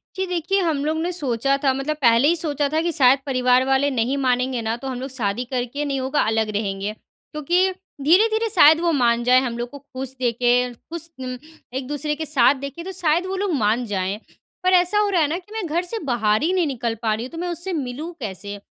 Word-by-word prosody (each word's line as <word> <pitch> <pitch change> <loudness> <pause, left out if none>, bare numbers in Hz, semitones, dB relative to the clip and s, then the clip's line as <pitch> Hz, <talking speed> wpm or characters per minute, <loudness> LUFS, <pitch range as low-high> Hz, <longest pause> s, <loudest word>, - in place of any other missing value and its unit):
जी 380 0 -1
देखिए, 360 +2 0
हम 315 -5 0
लोग 310 +1 0
ने 350 +2 -1
सोचा 275 -4 0
था 270 -2 +3
मतलब 275 +3 -2
पहले 235 +2 +5
ही 340 - +4
सोचा 295 -3 -1
था 310 +2 0
कि 340 +1 0
शायद 270 -4 +5
परिवार 255 -1 +3
वाले 270 +1 +2
नहीं 255 +2 0
मानेंगे 255 -2 0
ना 225 0 -1
तो 270 - -7
हम 255 -2 -4
लोग 265 +2 -5
शादी 240 -2 -2
करके 255 +3 -3
नहीं 275 -2 -1
होगा 265 +3 0
अलग 220 0 +1
रहेंगे। 200 0 -2
क्योंकि 345 - -2 0.3
धीरे-धीरे 435 +9 +3
शायद 320 -6 +6
वो 345 -1 +2
मान 240 -5 +2
जाएँ 250 +1 +5
हम 240 -3 -3
लोग 240 0 -4
को 285 - -10
ख़ुश 265 -1 -8
देखे 245 0 +2
ख़ुश 330 +7 -9
उम, 255 -1 -5 0.4
एक 260 0 -4
दूसरे 295 +1 -2
के 315 +1 -4
साथ 275 -3 +4
देखे 280 +4 -7
तो 380 - -6
शायद 345 -1 +1
वो 380 +1 -3
लोग 390 -2 -1
मान 230 -2 +1
जाएँ। 195 -1 -2 0.4
पर 370 0 +3
ऐसा 365 +3 +4
हो 415 -1 +2
रहा 365 -4 +2
है 300 - +3
न 320 +4 -2
कि 380 +3 -21
मैं 440 -4 -3
घर 330 +3 0
से 445 +6 -5
बाहर 220 -5 +1
ही 335 - +2
नहीं 360 -4 +2
निकल 235 -4 -2
पा 220 -2 +1
रही 225 +3 -3
हूँ 255 - -10
तो 330 - -9
मैं 355 +2 -3
उससे 350 +2 -4
मिलूँ 295 +2 -4
कैसे। 200 -1 -6
275 Hz, 235 wpm, -22 LUFS, 245-335 Hz, 0.4 s, शायद